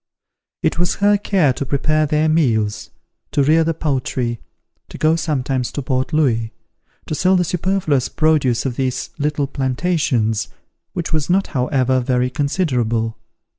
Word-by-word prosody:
It -, -, 0 dB
was 175 Hz, -, +1 dB
her 205 Hz, +1 st, +3 dB
care 190 Hz, -8 st, +2 dB
to 130 Hz, -, -4 dB
prepare 155 Hz, +3 st, +1 dB
their 150 Hz, +2 st, +2 dB
meals, 110 Hz, -9 st, +1 dB, 0.4 s
to 140 Hz, -, +3 dB
rear 160 Hz, +4 st, +4 dB
the 165 Hz, 0 st, -1 dB
poultry, 130 Hz, -6 st, -2 dB, 0.5 s
and -, -, -10 dB
go 155 Hz, +1 st, +3 dB
sometimes 135 Hz, -6 st, -1 dB
to 145 Hz, -, -3 dB
Port 130 Hz, 0 st, -1 dB
Louis, 115 Hz, -8 st, +1 dB, 0.5 s
to -, -, -4 dB
sell 185 Hz, +5 st, +3 dB
the 180 Hz, -, +3 dB
superfluous 175 Hz, -6 st, 0 dB
produce 150 Hz, -7 st, +1 dB
of 125 Hz, -3 st, -2 dB
these 130 Hz, -2 st, -2 dB
little 145 Hz, 0 st, 0 dB
plantations, 130 Hz, -, 0 dB, 0.5 s
which 170 Hz, -2 st, -4 dB
was 155 Hz, 0 st, 0 dB
not 195 Hz, +2 st, +3 dB
however, 130 Hz, -1 st, +1 dB
very 125 Hz, 0 st, 0 dB
considerable. 125 Hz, -7 st, 0 dB
140 Hz, 145 wpm, -19 LUFS, 125-160 Hz, 0.5 s, rear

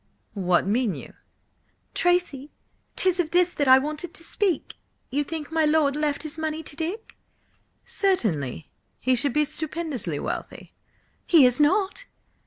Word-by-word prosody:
What 180 Hz, -4 st, +1 dB
mean 220 Hz, +1 st, +1 dB
you?" -, -, -10 dB, 0.8 s
"Tracy, 350 Hz, -6 st, 0 dB, 0.5 s
'tis 370 Hz, -1 st, +1 dB
of 335 Hz, -3 st, +1 dB
this 355 Hz, +1 st, +3 dB
that 285 Hz, -, 0 dB
I 260 Hz, 0 st, +9 dB
wanted 305 Hz, +5 st, -4 dB
to -, -, -8 dB
speak! 370 Hz, -2 st, -1 dB, 0.4 s
You 290 Hz, +3 st, +1 dB
think 310 Hz, 0 st, -6 dB
my 320 Hz, 0 st, +2 dB
lord 300 Hz, -2 st, +3 dB
left 295 Hz, -1 st, -1 dB
his 310 Hz, +1 st, -6 dB
money 315 Hz, 0 st, -3 dB
to 295 Hz, -, -11 dB
Dick?" 345 Hz, +8 st, -5 dB, 0.7 s
"Certainly. 170 Hz, -, -1 dB, 0.3 s
He 255 Hz, -, +1 dB
should 255 Hz, +1 st, +2 dB
be 300 Hz, +2 st, +3 dB
stupendously 295 Hz, -, -4 dB
wealthy." -, -, -6 dB, 0.5 s
"He 320 Hz, -6 st, +7 dB
is 250 Hz, +1 st, +3 dB
not!" 385 Hz, +10 st, +2 dB
300 Hz, 145 wpm, -25 LUFS, 260-340 Hz, 0.8 s, I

